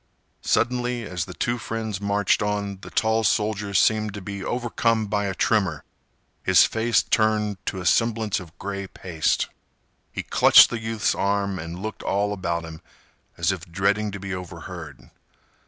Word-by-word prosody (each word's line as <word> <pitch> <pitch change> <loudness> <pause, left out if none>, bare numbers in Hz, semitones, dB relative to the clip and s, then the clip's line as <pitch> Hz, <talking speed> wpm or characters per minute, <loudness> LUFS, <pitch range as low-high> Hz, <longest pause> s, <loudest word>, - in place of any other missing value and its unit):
Suddenly, 125 -1 0
as 90 -5 -3
the - - -9
two 120 0 -1
friends 110 -4 -4
marched 100 -1 +1
on, 100 -1 -2
the - - -9
tall 110 0 +1
soldier 105 -2 0
seemed 110 +1 +3
to 105 - -6
be 100 0 -6
overcome 115 -2 0
by 100 0 -1
a 95 -1 -2
tremor. 95 - +1 0.6
His 95 -1 +6
face 115 +1 +1
turned 105 -3 +1
to 95 - -2
a 90 - -6
semblance 110 +1 +2
of 85 -3 -13
gray 100 0 -5
paste. 85 -4 -1 0.6
He - - -4
clutched - - +7
the 120 - -2
youth's 110 -1 0
arm 100 -1 0
and 85 +4 -7
looked 110 - -5
all 100 +1 0
about 85 -3 -2
him, 80 -1 -10 0.6
as 85 +3 +2
if 90 -2 -7
dreading 100 +4 +1
to 100 - -5
be 95 0 -5
overheard. 85 -4 -8
100 Hz, 160 wpm, -24 LUFS, 95-110 Hz, 0.6 s, clutched